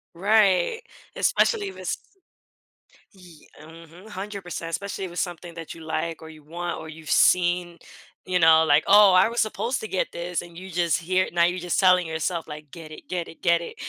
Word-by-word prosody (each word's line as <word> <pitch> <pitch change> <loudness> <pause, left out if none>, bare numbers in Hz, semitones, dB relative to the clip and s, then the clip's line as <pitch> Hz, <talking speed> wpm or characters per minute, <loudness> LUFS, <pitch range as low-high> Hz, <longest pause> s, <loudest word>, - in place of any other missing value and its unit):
Right, 200 - +2 0.4
especially 425 -4 +1
if 385 - -8
it's - - -3 1.1
ye 180 -6 -18
mhm. 165 +4 -14
100%, 190 -4 -6
especially 200 +3 -4
if 185 - -5
it's 175 - -5
something 175 -1 -5
that 165 -2 -8
you 165 - -12
like 165 +1 -3
or 160 - -10
you 155 -1 -14
want 175 +3 -5
or - - -9
you've 160 0 -9
seen, 175 -1 +3 0.5
you 185 -1 0
know, 160 -1 +6
like, 150 -1 +3
"Oh, 205 0 +7
I 185 +3 +5
was 235 +1 -1
supposed 230 +4 -2
to 220 - -6
get 190 - -2
this", 175 +1 -3
and 170 -1 -13
you 190 +2 -9
just 170 -1 +1
here 185 +2 +1
Now 170 -1 +3
you're 175 +2 +1
just 180 -1 -2
telling 185 -2 +4
yourself, 160 +1 -3
like, 150 -2 -10
"Get 165 -2 -11
it, - - -13
get 175 -2 -3
it, 165 - -14
get 170 -1 +3
it." 170 - -8
175 Hz, 200 wpm, -24 LUFS, 165-185 Hz, 1.1 s, Oh